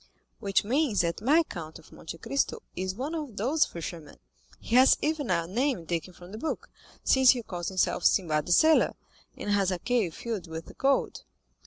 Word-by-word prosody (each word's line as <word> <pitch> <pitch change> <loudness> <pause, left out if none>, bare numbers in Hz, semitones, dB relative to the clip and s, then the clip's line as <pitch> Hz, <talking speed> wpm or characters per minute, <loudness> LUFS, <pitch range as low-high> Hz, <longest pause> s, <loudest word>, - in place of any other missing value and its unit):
"Which 200 -3 +1
means 245 -1 +1
that 170 +3 -2
my 300 +9 +4
Count 160 - -8
of - - -18
Monte 165 - -9
Cristo 270 +9 -2
is 185 +1 -3
one 275 +8 -4
of 295 -10 -5
those 270 +9 +2
fishermen. 165 -2 -8 0.4
He 230 - -2
has 260 +1 +7
even 300 -4 -1
a 170 -2 +1
name 230 - -1
taken 170 +2 -3
from 175 +1 -14
the 215 - -7
book, 315 - -4 0.3
since 265 -1 +5
he 245 -2 +4
calls 175 -4 -5
himself 185 -1 0
Sinbad 155 -6 +2
the - - -2
Sailor, 315 - +5 0.4
and 205 - -3
has 200 -2 +2
a 185 - -1
cave 220 -4 -1
filled 220 -7 -5
with 160 0 -8
gold." 275 0 +1
205 Hz, 185 wpm, -28 LUFS, 175-265 Hz, 0.4 s, has